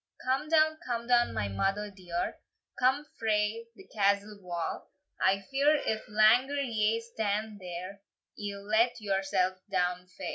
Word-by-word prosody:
"Come 270 +4 0
down, 315 -1 +4
come 235 -2 -3
down, 240 0 +3
my 105 -2 -1
mother 195 - -1
dear, 180 -3 -4 0.4
Come 265 +4 +3
frae 220 +1 0
the - - -14
castle 200 0 +1
wa! 175 -2 -3 0.4
I 190 +1 +3
fear, 280 +6 +2
if 220 -7 -2
langer 230 +7 +4
ye 225 -4 +1
stand 220 -2 -3
there, 185 +2 -7 0.3
Ye'll 200 -1 -6
let 225 +3 +2
yoursell 195 -2 0
down 180 -1 0
fa." 180 - -13
210 Hz, 140 wpm, -30 LUFS, 195-235 Hz, 0.4 s, down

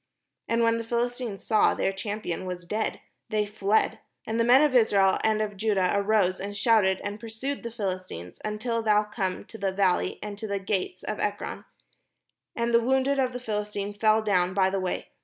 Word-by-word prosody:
And 230 0 +2
when 230 0 +3
the - - -3
Philistines 240 -2 -2
saw 215 -2 +3
their 195 - 0
champion 195 -3 -4
was 180 -1 -5
dead, 215 +5 -2 0.3
they 215 -1 +1
fled. 205 +1 +1 0.3
And 225 +1 -2
the - - +4
men 250 +5 +6
of 295 -3 +2
Israel 200 -5 +4
and 215 -1 +2
of 205 -1 -5
Judah 195 -3 +1
arose, 200 -2 +2
and 205 +1 -5
shouted, 200 -4 +3
and 205 +1 -4
pursued 230 +5 -4
the 235 - -5
Philistines, 185 - -5
until 230 +2 -2
thou 210 -1 +3
come 195 -3 -3
to 225 - -11
the 195 -1 0
valley, 190 -1 +1
and 205 -1 -6
to 220 - -4
the 200 -1 -1
gates 190 -2 -3
of 215 - -4
Ekron. 205 0 -3 0.9
And 235 0 -1
the 235 - +6
wounded 265 +3 +2
of 255 -1 +1
the 250 - -5
Philistines 210 -3 -3
fell 215 0 +3
down 185 -3 +1
by 190 -1 +3
the 195 - 0
way. 185 -1 -3
210 Hz, 195 wpm, -27 LUFS, 195-230 Hz, 0.9 s, men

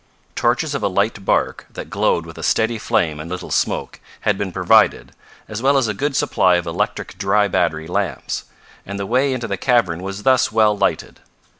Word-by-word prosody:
Torches 125 +6 0
of 140 - -2
a - - +1
light 100 +2 -1
bark, - - 0
that - - -8
glowed 85 - +1
with 80 -1 -11
a - - -6
steady 110 0 +1
flame 80 -7 0
and 80 +2 -7
little 90 0 -6
smoke, - - -1 0.2
had - - +1
been - - -3
provided, - - +3 0.4
as 105 +1 -5
well 140 +2 +3
as 130 -4 +2
a 105 - -1
good 140 +7 -2
supply 90 -7 +3
of 90 0 -1
electric 85 - -3
dry 100 +1 +2
battery 80 -4 0
lamps, 95 +2 -3 0.4
and 100 +1 -6
the 100 - -3
way 130 +6 +1
into 125 -3 -3
the 100 -2 -3
cavern 95 -8 +1
was 95 +2 -6
thus 130 -4 +3
well 110 -1 +3
lighted. 100 - -1
100 Hz, 195 wpm, -20 LUFS, 90-120 Hz, 0.4 s, provided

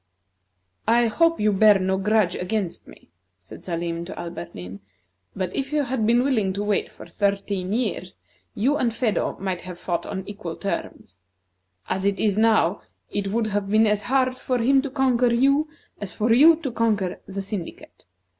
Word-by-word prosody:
"I 235 +1 +4
hope 330 +9 +2
you 210 0 +2
bear 210 +1 +6
no 190 0 0
grudge 205 -1 +2
against 185 -1 -3
me," - - -17 0.3
said 95 - -13
Salim 170 -1 -3
to 185 - -8
Alberdin; 90 - -7 0.6
"but 185 -1 -3
if 275 0 -3
you 300 -1 +1
had 250 -4 -1
been 240 +2 +4
willing 220 -9 +1
to 200 +2 -3
wait 205 -1 0
for - - -12
thirteen 200 -2 -2
years, 210 -5 -2 0.4
you 270 +8 +1
and 240 -2 +1
Phedo 230 -5 -1
might 185 -2 -3
have 180 -1 -8
fought 175 -1 -3
on 190 -1 -4
equal 200 -5 -6
terms. 100 - -5 0.7
As 190 - -2
it 200 0 0
is 205 -3 +2
now, 215 -4 +3 0.3
it 200 -1 -2
would 220 +3 0
have 205 -2 -2
been 215 +2 +4
as 210 -1 +1
hard 255 +1 0
for 255 - -1
him 265 +3 +3
to 280 - -4
conquer 255 -3 +2
you, 275 +6 +3 0.3
as 205 -3 -5
for 225 +6 +1
you 310 +7 +7
to 265 - -2
conquer 215 -5 0
the 195 0 -5
syndicate. 190 - -7
210 Hz, 175 wpm, -24 LUFS, 190-240 Hz, 0.7 s, you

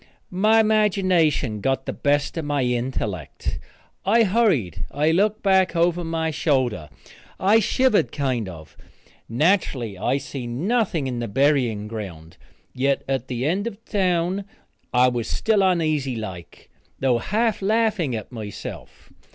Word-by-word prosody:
My 215 +5 +4
imagination 185 - +2
got 135 +3 0
the - - -3
best 145 0 0
of 165 - -3
my 145 -2 0
intellect. 120 - -3 0.4
I 230 +4 +4
hurried. 180 - +1
I 150 +2 +1
looked 205 +5 +1
back 190 -3 +3
over 175 +1 +2
my 165 -1 -1
shoulder. 130 - 0 0.5
I 205 +4 +5
shivered, 220 - +2
kind 130 -8 -1
of. 80 -3 -12 0.5
Natural 120 - 0
I 135 - +2
see 135 -3 -6
nothing 170 - 0
in 125 -2 -3
the 120 - -3
burying 120 -3 +1
ground, 90 -8 -8 0.4
yet 135 +2 0
at 135 -2 -2
the 125 0 -3
end 190 +8 0
of 225 -1 -8
town 185 -1 0 0.5
I 125 +1 +4
was 120 -2 -1
still 220 -3 +1
uneasy 155 -8 +1
like, 95 -7 -8 0.3
though 125 -3 +2
half 220 - 0
laughing 210 - +1
at 110 +1 -6
myself. 110 -4 -8
145 Hz, 135 wpm, -23 LUFS, 120-190 Hz, 0.5 s, I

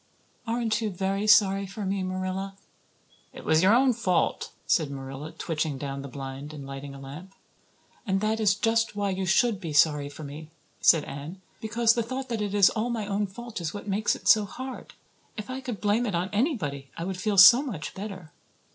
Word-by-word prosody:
"Aren't 225 -2 0
you 220 - -1
very 195 +2 -2
sorry 200 -2 +5
for 200 +2 -6
me, 195 0 -1
Marilla?" 185 +1 -4 0.8
"It - - -11
was 160 0 +4
your 195 +5 +5
own 255 0 +4
fault," 185 -7 0
said 155 -4 +2
Marilla, 135 +2 -7
twitching 160 -3 -3
down 140 0 -5
the 140 - -7
blind 135 +2 -7
and 140 -2 -8
lighting 135 0 -8
a - - -10
lamp. 150 +8 -10 0.7
"And 190 0 +1
that 215 +2 0
is 205 -3 +3
just 225 +1 +1
why 200 -1 -1
you 190 0 -2
should 205 +2 +2
be 165 -4 -5
sorry 145 -1 +3
for 150 +2 -10
me," 150 +2 -9 0.3
said 160 -3 +5
Anne, 150 +7 -8 0.2
"because 230 +1 +2
the 235 - 0
thought 260 +3 -5
that 230 -3 -2
it 205 -1 -2
is 200 -2 +6
all 230 +2 -2
my 230 -3 -2
own 205 0 -1
fault 225 +1 -8
is 165 +3 -4
what 205 - -7
makes 205 +2 +1
it - - -9
so 215 -2 +6
hard. 260 +6 -8 0.4
If 210 +3 -6
I 260 +1 -5
could 245 -5 -5
blame 215 +4 +1
it 200 - -2
on 180 +3 -2
anybody 185 - -1
I 165 - -4
would 185 0 -4
feel 210 -1 0
so 235 +7 +10
much 195 - -5
better. 190 -5 -8
195 Hz, 205 wpm, -27 LUFS, 155-220 Hz, 0.8 s, so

